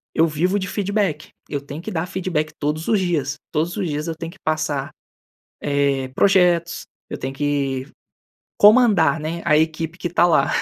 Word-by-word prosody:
eu 165 - +5
vivo 175 +6 0
de 195 -1 -3
feedback. 200 -7 -1 0.2
Eu 145 -2 -3
tenho 140 +2 -8
que 170 - -6
dar 165 0 -2
feedback 175 -5 -2
todos 150 +2 -2
os 215 - +3
dias, 155 -7 -1 0.2
todos 165 +5 -1
os 195 -4 -1
dias 150 +1 -3
eu 165 - -3
tenho 165 +1 -7
que - - -19
passar, 155 -3 -1 0.7
eh, 140 -2 0
projetos, 175 -3 +3 0.2
eu - - -6
tenho 135 +1 -5
que 140 -2 -1 0.7
comandar, 205 - +5
né, 165 +2 -4
a 155 -2 +4
equipe 160 +1 -1
que 175 - -3
tá 175 +1 +3
lá. 155 -5 +3
160 Hz, 175 wpm, -21 LUFS, 145-180 Hz, 0.7 s, eu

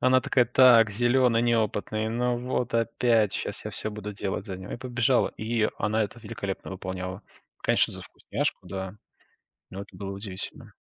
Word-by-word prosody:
Она 130 0 +5
такая, 125 -1 +3
так, 120 -3 +6
зелёный, 120 +2 +3
неопытный, 110 -2 0
ну 120 +1 0
вот 125 0 -2
опять 115 -2 +2
щас - - -4
я - - -4
всё 110 - -2
буду 105 0 -6
делать 100 +1 -3
за 95 -3 -5
него. 95 +1 -8
И - - -3
побежала, 125 0 +2
и 110 0 0
она 110 +1 +1
это 120 +4 -9
великолепно 100 -3 -5
выполняла. 95 0 -5 0.4
Конечно, - - +3
за - - -4
вкусняшку, - - -3
да, 95 0 -5 0.8
но 95 +1 -6
это 100 - -15
было 100 -1 -5
удивительно. 95 -1 -7
110 Hz, 165 wpm, -27 LUFS, 100-120 Hz, 0.8 s, так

